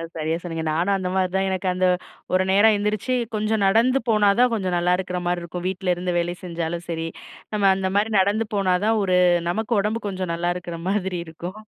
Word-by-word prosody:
சரியா 160 +1 -1
சொன்னீங்க. 165 -2 -4
நானும் 180 +5 +1
அந்த 185 -1 -3
மாதிரி 185 -1 +1
தான். 195 0 +1
எனக்கு 190 0 -2
அந்த 185 0 +1 0.5
ஒரு 185 0 +4
நேரம் 210 +2 +5
எந்திரிச்சி, 210 +4 -1 0.2
கொஞ்சம் 215 0 0
நடந்து 235 +7 +3
போனா 210 -2 +4
தான், 250 -1 +5
கொஞ்சம் 185 -5 -1
நல்லா 175 +1 +1
இருக்கிற 180 -1 -3
மாரி 175 0 0
இருக்கும். 175 +1 -6
வீட்ல 185 -1 0
இருந்து 180 0 -2
வேலை 175 +1 -2
செஞ்சாலும் 170 -1 -4
சரி, 165 -1 -2 0.5
நம்ம 200 -2 +3
அந்த 190 0 -1
மாரி 215 +2 +1
நடந்து 205 +3 +1
போனா 190 -2 +2
தான், 220 0 +2
ஒரு 185 -1 +2 0.3
நமக்கு 220 +5 -1
உடம்பு 220 +3 -2
கொஞ்சம் 185 -3 -3
நல்லா 175 +1 -1
இருக்கிற 170 -1 -7
மாதிரி 190 -3 -1
இருக்கும். 175 +5 -8
185 Hz, 200 wpm, -23 LUFS, 175-210 Hz, 0.5 s, நேரம்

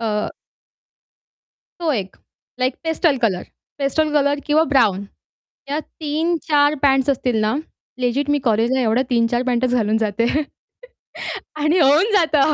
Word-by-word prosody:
अ 220 -2 -1 1.6
तो 325 -3 0
एक 195 -7 -4 0.4
like 255 0 +1
pastel 320 -2 +1
colour, 185 -5 0 0.4
pastel 295 +2 0
colour 285 -1 +2
किंवा 305 +1 +3
ब्राउन 200 -7 +2 0.6
या 290 - 0
3-4 305 -1 0
पँट्स 270 0 +3
असतील 250 -3 -1
ना 215 +3 +1 0.5
लेजिट 260 +4 0
मी 290 - +2
कॉलेजला 230 +4 +2
एवढ्या 235 +1 +2
3-4 240 0 +1
पँटच 250 0 +1
घालून 220 -2 +1
जाते. 220 +1 0 1.3
आणि 305 +4 +2
होऊन 315 +8 +4
जातं. 310 -6 +3
270 Hz, 125 wpm, -20 LUFS, 230-300 Hz, 1.6 s, होऊन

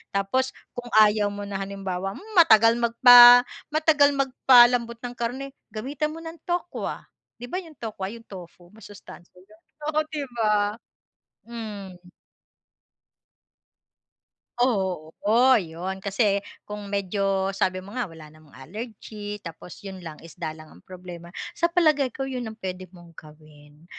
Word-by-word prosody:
Tapos 255 +7 0 0.3
kung 245 0 -6 0.2
ayaw 210 0 +2
mo 205 - -7
na 200 -1 -4
halimbawa, 195 -1 -4
"Hmm, 435 +3 -12
matagal 230 -7 +6
magpa 245 +1 +8 0.3
matagal 305 -2 +4
magpalambot 245 -3 +4
ng 245 0 -6
karne." 260 +4 -4 0.2
Gamitan 290 +7 -3
mo 325 - -8
ng 325 +1 -8
tokwa, 350 0 -3 0.4
'di 245 - -6
ba, 365 - -2
'yong 320 -5 -15
tokwa, 210 -4 -5
'yong 230 +1 -10
tofu, 175 -2 -12
masustansiya 200 -4 -14
'yon, 210 +4 -20 0.3
oh, 310 - +3
'di 300 -3 -4
ba? 210 -1 +1 0.7
Hmm. 210 -5 -8 2.6
Oo, 190 -10 0 0.5
'yon. 180 +3 -6
Kasi 200 0 +1 0.2
kung 210 -1 -8
medyo 195 -1 -1
sabi 185 -1 -1
mo 200 - -12
nga, 245 -3 -3
wala 155 -2 -13
namang 155 -3 -19
allergy 210 - -8
tapos 170 +4 -11
'yon 190 -1 -8
lang, 160 -3 -9
isda 160 -1 -7
lang 155 0 -14
ang - - -17
problema. 175 -2 -11 0.2
Sa 340 - 0
palagay 310 -6 +2
ko 270 +2 -6
'yon 250 -4 -5
ang 220 - -10
puwede 185 -2 -6
mong 175 -2 -16
gawin. 150 0 -17
205 Hz, 140 wpm, -24 LUFS, 185-245 Hz, 2.6 s, magpa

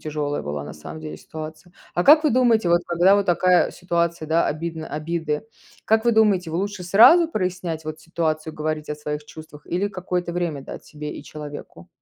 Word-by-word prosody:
тяжелая 150 -1 -3
была, 75 0 -4
на - - -8
самом 75 - -9
деле, 155 -1 -7
ситуация. 155 +3 -9 0.2
А 175 - +1
как 310 +2 +7
вы 300 - +4
думаете, 230 -6 +3
вот, 175 0 +4
когда 175 +3 +4
вот 200 -1 0
такая 180 0 +3
ситуация, 170 -2 -2
да, 165 +2 +2
обидно 160 +1 -4
обиды, 155 +3 -3 0.4
как 220 +1 +2
вы 235 - +4
думаете, 205 -6 +3
вы, 165 - -2
лучше 200 -1 -3
сразу 315 - +7
прояснять 180 - -3
вот 155 0 -6
ситуацию, 160 -1 -2
говорить 155 0 -3
о 150 - -3
своих 150 0 -5
чувствах 150 -1 -13
или 185 +4 -1
какое-то 180 -2 -3
время 170 -6 -2
дать - - -9
себе 150 -1 -7
и - - -8
человеку? 145 - -10
170 Hz, 190 wpm, -23 LUFS, 155-185 Hz, 0.4 s, как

